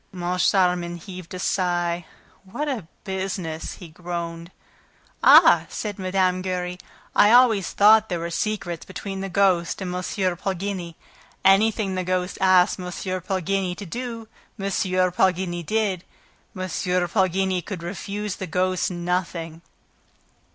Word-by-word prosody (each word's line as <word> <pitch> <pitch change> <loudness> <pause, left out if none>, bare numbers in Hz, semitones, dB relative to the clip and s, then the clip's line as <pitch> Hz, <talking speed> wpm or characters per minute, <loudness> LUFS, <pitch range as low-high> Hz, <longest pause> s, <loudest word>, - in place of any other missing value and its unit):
Moncharmin 180 -1 +1
heaved 180 0 -10
a - - -4
sigh. 175 -2 0 0.4
"What 285 +11 -4
a 235 - -3 0.2
business!" 190 -4 -4
he 180 - -11
groaned. 170 0 -6 0.7
"Ah!" - - +7
said 210 -2 -5
Mme. 185 -1 +1
Giry. 180 -1 -3 0.4
"I 205 - +6
always 235 -6 +5
thought 215 +1 +5
there 175 - -1
were 170 +1 -4
secrets 180 -3 -2
between 195 +1 -6
the 195 - -4
ghost 185 -3 +2
and 185 -2 -4
M. 180 - -2 0.4
Poligny. 190 -2 -4 0.5
Anything 200 +1 +4
that 185 - -1
the - - -6
ghost 185 0 -2
asked 185 -1 +4
M. 180 - -5 0.4
Poligny 185 0 -1
to 200 - -8
do 230 +3 -6 0.3
M. 195 - -4 0.5
Poligny 180 -1 +1
did. 200 -1 -1 0.5
M. - - -4 0.5
Poligny 190 0 +1
could 180 -1 -7
refuse 200 +3 -4
the 190 - -5
ghost 185 +2 0
nothing." 175 -2 -3
185 Hz, 130 wpm, -24 LUFS, 175-195 Hz, 0.7 s, Ah